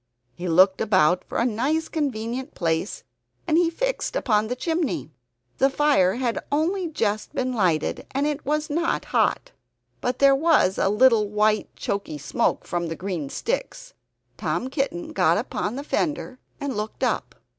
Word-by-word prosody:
He 175 +1 -6
looked 185 +3 +4
about 185 -5 +3
for - - -5
a 235 - +2
nice 270 +8 0
convenient 260 -2 -3
place, 165 +2 -1 0.4
and 315 - +2
he 340 0 +4
fixed - - -2
upon 215 - +2
the 250 - -2
chimney. 320 - -2 0.5
The 270 - +5
fire 270 -10 +3
had 240 -2 -1
only 340 +5 +1
just 215 -9 -2
been 255 0 -1
lighted, 180 -9 0
and 275 +2 -1
it 300 0 -2
was 300 +2 -1
not 330 +3 -1
hot; - - +1 0.5
but 250 0 -1
there 275 0 +6
was 295 - +3
a - - +3
white 215 -2 +3
choky 200 -6 -3
smoke 140 - -1
from 175 -1 -2
the 165 - -4
green 175 -7 -4
sticks. - - -4 0.4
Tom 260 - -2
Kitten 315 +4 -2
got - - +3
upon 210 - -2
the 280 - -5
fender 290 -4 -2 0.2
and 280 -3 -3
looked 210 +1 -4
up. - - -1
255 Hz, 155 wpm, -24 LUFS, 205-305 Hz, 0.5 s, there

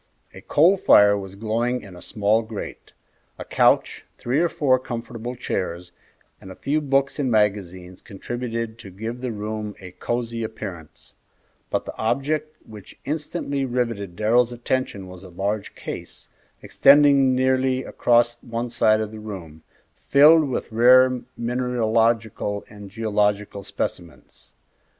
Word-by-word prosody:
A - - -11
coal 175 +7 +4
fire 105 - +6
was 95 -1 -7
glowing 115 +4 -1
in 95 -3 -12
a 90 - -12
small 105 +1 +1
grate; 110 -2 -8 0.5
a - - -8
couch, - - +2
three 125 +5 -1
or 170 0 +2
four 130 -5 +2
comfortable 120 0 -6
chairs, 90 -7 -4 0.5
and 95 - -11
a - - -10
few 150 +3 -1
books 140 0 0
and 135 -3 0
magazines 95 -4 -1
contributed 115 +2 -5
to 95 - -10
give 110 +6 -6
the 125 -2 -3
room 105 0 -5
a 90 -2 -10
cosey 115 +3 -3
appearance, 95 -8 -9 0.6
but - - -2
the - - -7
object 155 +6 -1
which 105 -3 -13
instantly 145 -2 -3
riveted 115 -7 -2
Darrell's 115 +4 +2
attention 120 -4 -3
was 90 -1 -11
a 95 - -11
large 100 +4 -3
case, - - -8 0.3
extending 140 -2 +5
nearly 130 0 +1
across 120 0 +1
one 115 +1 -4
side 110 -2 +3
of 110 -1 -4
the 110 - -9
room, 90 -7 -9 0.3
filled 150 +1 +5
with 125 - -4
rare 125 +2 +5 0.2
mineralogical 115 -3 0
and 105 -2 -11
geological 105 -1 -1
specimens. 85 -5 -7
115 Hz, 135 wpm, -23 LUFS, 105-130 Hz, 0.6 s, fire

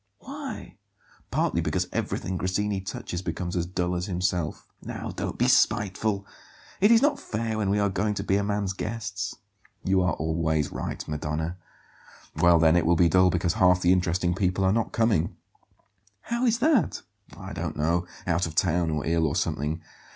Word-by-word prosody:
"Why?" - - -8 0.5
"Partly - - +1
because - - -1
everything 95 - -2
Grassini 95 +2 -1
touches 90 -2 -5
becomes 85 0 -4
as 85 -1 -1
dull 90 -1 -1
as 90 +2 -2
himself." 90 -3 -1 0.2
"Now - - -6
don't - - -4
be - - +2
spiteful. 100 0 +2 0.5
It 205 - +5
is 230 +2 +6
not 290 -1 +2
fair 110 0 -3
when 100 -2 0
we 100 - +2
are 100 0 +2
going 100 +2 -1
to 100 - -3
be 100 -1 +2
a 100 - 0
man's 100 -2 -1
guests." 105 -1 -4 0.5
"You 95 0 +2
are 90 -3 +1
always 80 -1 0
right, - - -5
Madonna. 75 +3 -3 0.8
Well 85 -1 +6
then, 80 0 +5
it 85 -2 +2
will 85 - +4
be 85 0 +4
dull 90 +2 +5
because 90 0 0
half 90 -1 +4
the 90 +1 +5
interesting 90 -1 +1
people 90 +1 0
are 95 +1 +3
not 115 0 0
coming." 110 -8 +1 0.9
"How 235 +2 -1
is 230 0 +3
that?" 255 - +2 0.3
"I 95 0 -8
don't 80 -3 -4
know. 85 +3 +1 0.2
Out 85 0 +1
of 80 - -9
town, 85 -2 +2
or 75 -2 -2
ill, 80 0 +2
or 70 - -2
something. 80 +3 -1
90 Hz, 180 wpm, -26 LUFS, 85-100 Hz, 0.9 s, is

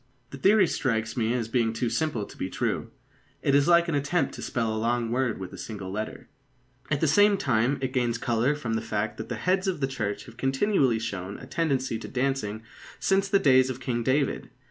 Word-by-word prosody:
The 140 - -8
theory 195 +6 +5
strikes 115 -8 -1
me 115 -2 0
as 115 -3 -1
being 115 -1 +1
too 115 +1 -1
simple 150 -10 -1
to - - -13
be 95 - -4
true. - - -2 0.5
It 140 - +2
is 140 0 +4
like 170 0 +5
an 165 - -1
attempt 145 +5 0
to - - -8
spell 115 -2 -1
a - - -2
long 115 0 0
word 125 -2 0
with 95 -1 -7
a - - -9
single 100 -4 -6
letter. 110 +2 -5 0.6
At 150 -2 0
the 160 - +3
same 205 +6 +5
time, 130 - +1
it 130 0 -2
gains 120 -2 +1
colour 120 +6 +1
from 125 -6 -3
the 110 - 0
fact 105 +2 -2
that - - -6
the - - -2
heads 185 +1 0
of 185 -5 -1
the 135 - +1
Church 110 -7 -3
have 120 -1 -14
continually 135 - +2
shown 100 -3 -4
a - - -10
tendency 135 -5 -1
to - - -7
dancing 125 -5 -2 0.4
since 195 0 +2
the 200 - +4
days 130 -6 +4
of 130 -1 -4
King 120 -2 -2
David. 135 +3 0
130 Hz, 220 wpm, -27 LUFS, 115-145 Hz, 0.6 s, theory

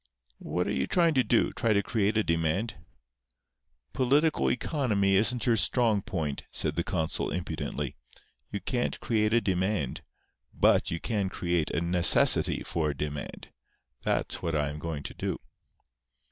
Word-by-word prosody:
"What - - -2
are - - -2
you 65 0 -1
going 170 -2 +3
to 130 -3 +3
do—try 115 -1 +1
to 100 0 +2
create 105 -1 0
a 110 - +3
demand?" 85 +7 -1 1.2
"Political 145 +5 +2
economy 115 -8 0
isn't 110 +4 +2
your 120 - +3
strong 115 -3 +2
point," 80 -7 -3
said 75 -1 -1
the 85 - 0
consul, 80 -3 -2
impudently. 75 -5 -4 0.6
"You 100 - -4
can't 120 -2 -2
create 110 -2 +1
a 115 +1 +3
demand. 95 - -1 0.5
But - - +3
you 85 - -3
can 100 -2 -1
create 85 -4 -1
a - - -1
necessity 85 0 +4
for 80 -3 -1
a 70 - -4
demand. 75 0 -5 0.5
That's - - -1
what 85 -2 -2
I 75 -1 0
am 75 - -7
going 75 -2 -5
to - - -6
do." - - -3
95 Hz, 150 wpm, -28 LUFS, 80-115 Hz, 1.2 s, necessity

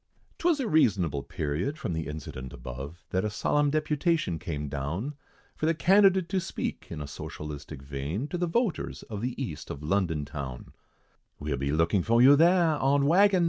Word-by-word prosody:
'Twas 335 -3 +2
a 260 - -1
reasonable 95 - +2
period, 80 - -3
from 90 - -3
the 80 -1 -3
incident 70 -4 -6
above, 65 +7 -8
That 95 - +1
a 105 - 0
solemn 145 +7 +1
deputation 155 - 0
came 75 -3 -4
down, 75 - -3 0.4
For 155 - -1
the 165 - +2
candidate 190 +1 +5
to 190 - +1
speak - - -4
in 80 -3 -5
a - - -7
socialistic 75 0 -7
vein, 70 - -3
To 180 - -3
the 175 - +1
voters 225 +2 -1
of 105 -2 -6
the 125 +2 -3
east 85 - -5
of 70 - -6
London 80 -3 0
town: 65 -4 -7 0.6
"We'll 75 -1 -2
be 70 +2 -1
looking 80 +5 +2
for 115 +5 +3
you 135 +4 +8
there, 165 0 +4
on 140 +1 +3
waggon 190 +5 +5
No. - - +2
100 Hz, 180 wpm, -28 LUFS, -, 0.6 s, you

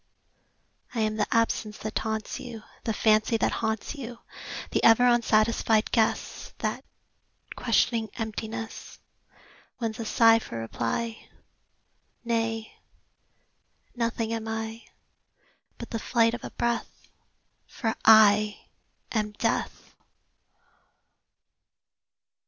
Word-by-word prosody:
I 230 - 0
am 215 0 0
the 210 - +1
absence 225 -2 0
that 215 0 -5
taunts 220 -1 -3
you, 230 -3 -8 0.2
The 225 - +1
fancy 215 +1 +3
that - - +1
haunts 220 +2 -2
you; 245 -5 -7 0.5
The - - 0
ever 230 +2 +7
unsatisfied 225 -2 +3
guess 225 -3 0
That, - - -3 0.7
questioning 225 -2 +1
emptiness, 225 0 -5 0.8
Wins 225 -2 -3
a 230 - -3
sigh 225 +1 +5
for 115 - -7
reply. 115 - -3 1.0
Nay; 225 -1 -1 1.2
nothing 230 -1 -1
am 225 -1 -4
I, 225 +1 -4 0.9
But 235 - -9
the 225 - -2
flight 230 0 +2
of 240 - -5
a - - -5
breath 235 0 -3 0.6
For 225 -3 -2
I 215 -1 +6 0.5
am 210 -2 -1
Death! - - -2
225 Hz, 100 wpm, -27 LUFS, 215-230 Hz, 1.2 s, ever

